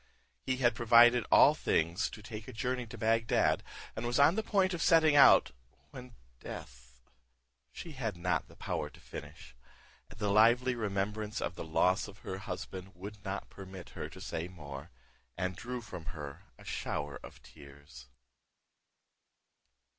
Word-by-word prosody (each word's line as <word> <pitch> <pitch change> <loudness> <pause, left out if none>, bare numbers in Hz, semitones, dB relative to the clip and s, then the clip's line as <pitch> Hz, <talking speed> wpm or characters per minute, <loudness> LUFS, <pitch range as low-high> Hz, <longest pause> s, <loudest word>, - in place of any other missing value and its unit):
He 130 0 +1
had 120 -3 +3
provided 120 +1 +6
all - - +8
things 85 +8 0
to 105 - -11
take 110 0 -8
a - - -7
journey 125 +2 -2
to 115 +1 -9
Bagdad, 115 +1 +2 0.3
and 110 - -4
was 120 - 0
on 145 +3 +6
the 220 - 0
point 195 -3 +1
of 170 - -3
setting 160 -3 +5
out, 140 - +7 0.4
when 125 -2 -11 0.2
death" 60 0 -10 0.7
She 170 - -8
had 115 - -4
not 90 +1 -1
power - - -3
to - - -18
finish; 75 -4 -10 0.5
the 105 -1 -2
lively 120 +5 +5
remembrance 105 -1 -2
of 80 - -2
the - - -7
loss 90 +5 +2
of 100 0 -12
her 95 - -4
husband 95 -1 -7
would 100 +3 -9
not 100 -1 -5
permit 95 -1 -10
her - - -6
to - - -12
say 80 +2 -4
more, 75 -4 -9 0.5
and 90 0 -2
drew 125 +5 -5
from 90 -7 -9
her 70 -2 -8
a - - -16
shower 75 -1 -4
of - - -12
tears. 70 -3 -14
105 Hz, 155 wpm, -32 LUFS, 85-120 Hz, 0.7 s, all